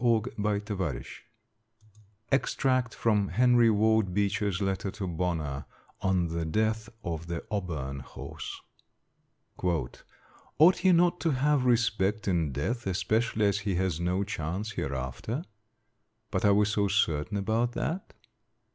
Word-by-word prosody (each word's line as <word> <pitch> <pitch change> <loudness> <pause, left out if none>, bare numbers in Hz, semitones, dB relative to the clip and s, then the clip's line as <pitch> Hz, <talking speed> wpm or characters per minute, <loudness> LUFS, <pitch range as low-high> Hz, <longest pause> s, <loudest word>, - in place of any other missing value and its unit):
Extract 130 -2 +1
from 105 -3 +2
Henry 120 0 +4
Ward 110 -3 +2
Beecher's 100 -1 0
letter 95 -1 -1
to 100 0 -5
Bonner 80 -6 -2 0.4
on 90 -3 +1
the 85 0 -2
death 110 +6 0
of 85 -3 -4
the 85 -1 -4
Auburn 75 -10 -3
horse: 65 - -8 1.0
"Ought 90 - 0
he 190 - +4
not 175 0 +4
to 165 - +1
have 140 0 +2
respect 110 -4 +1
in 85 -6 +1
death, 105 - -2
especially 110 +3 +1
as 100 0 +2
he 100 -1 -2
has 90 -3 0
no 90 +3 0
chance 100 +2 -3
hereafter? 70 - -3 0.9
But 95 0 0
are 100 - +6
we 105 +1 +4
so 105 -1 +1
certain 100 -1 +1
about 110 +4 0
that? 175 +8 -3
100 Hz, 120 wpm, -29 LUFS, 85-115 Hz, 1.0 s, are